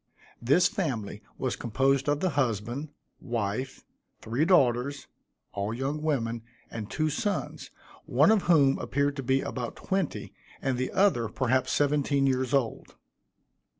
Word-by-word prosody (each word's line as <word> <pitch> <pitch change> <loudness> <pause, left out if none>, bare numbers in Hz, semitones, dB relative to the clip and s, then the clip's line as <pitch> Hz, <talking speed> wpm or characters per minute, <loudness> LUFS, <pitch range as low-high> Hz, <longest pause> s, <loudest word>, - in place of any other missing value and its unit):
This 145 +9 +4
family 130 - -3 0.2
was 130 - -2
composed 135 +4 +1
of 145 +1 +1
the 185 - +1
husband, 125 +1 -1 0.3
wife, 120 +3 -3 0.4
three 120 +8 0
daughters, 140 -5 +2 0.5
all 100 +3 -2
young 140 +4 -2
women, 120 -7 -1 0.3
and 110 -2 -6
two 155 +6 0
sons, 205 +7 -3 0.4
one - - +4
of 220 -3 +4
whom 140 -5 +5
appeared 140 +1 0
to - - -2
be 135 +1 +1
about 120 -2 -4
twenty, 195 -1 -3 0.3
and 130 -2 -1
the 130 - -1
other, 180 - +2
perhaps 130 +2 0
seventeen 145 -1 +2
years 130 -1 +1
old. 135 -5 -1
135 Hz, 135 wpm, -28 LUFS, 120-145 Hz, 0.5 s, whom